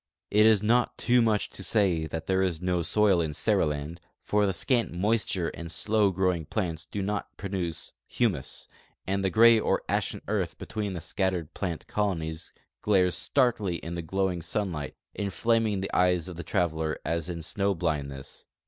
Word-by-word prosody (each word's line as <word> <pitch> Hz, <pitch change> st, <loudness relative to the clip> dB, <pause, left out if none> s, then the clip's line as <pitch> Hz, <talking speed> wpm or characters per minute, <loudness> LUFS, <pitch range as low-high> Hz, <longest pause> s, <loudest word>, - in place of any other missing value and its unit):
It 105 Hz, +1 st, +6 dB
is 105 Hz, -2 st, +4 dB
not 120 Hz, +3 st, +2 dB
too 125 Hz, 0 st, +3 dB
much 110 Hz, -3 st, +1 dB
to -, -, -9 dB
say 95 Hz, -6 st, +2 dB
that 80 Hz, 0 st, -5 dB
there 95 Hz, +1 st, +1 dB
is 90 Hz, -4 st, 0 dB
no 90 Hz, 0 st, 0 dB
soil 95 Hz, +1 st, +3 dB
in 75 Hz, -3 st, -2 dB
Seriland, 75 Hz, +4 st, 0 dB, 0.2 s
for 105 Hz, -1 st, +2 dB
the -, -, +2 dB
scant 115 Hz, +6 st, 0 dB
moisture 95 Hz, -2 st, 0 dB
and 85 Hz, -1 st, -8 dB
slow 105 Hz, +3 st, +3 dB
growing 90 Hz, -4 st, 0 dB
plants 85 Hz, -7 st, -2 dB
do 100 Hz, +3 st, -4 dB
not 105 Hz, +1 st, -3 dB
produce 90 Hz, -5 st, -4 dB, 0.2 s
humus; -, -, -1 dB, 0.4 s
and 100 Hz, +1 st, -1 dB
the 95 Hz, -, +2 dB
gray 115 Hz, +4 st, +7 dB
or -, -, 0 dB
ashen -, -, -1 dB
earth -, -, -1 dB
between 105 Hz, -3 st, -4 dB
the 85 Hz, -, -5 dB
scattered 90 Hz, -3 st, -2 dB
plant 85 Hz, -5 st, -4 dB
colonies 80 Hz, -6 st, -2 dB, 0.3 s
glares 95 Hz, -4 st, +3 dB
starkly 115 Hz, -9 st, +1 dB
in 85 Hz, 0 st, -6 dB
the 85 Hz, -, -3 dB
glowing 95 Hz, +1 st, -1 dB
sun 95 Hz, +4 st, -2 dB
light, 75 Hz, -4 st, -5 dB, 0.2 s
inflaming 105 Hz, +1 st, 0 dB
the 95 Hz, -, -4 dB
eyes 90 Hz, -1 st, +2 dB
of 90 Hz, -, -7 dB
the 85 Hz, -, -6 dB
traveler 80 Hz, -2 st, -1 dB
as 85 Hz, +1 st, -2 dB
in 85 Hz, -2 st, -5 dB
snow 100 Hz, +3 st, 0 dB
blindness. 70 Hz, -5 st, -4 dB
90 Hz, 175 wpm, -28 LUFS, 85-105 Hz, 0.4 s, gray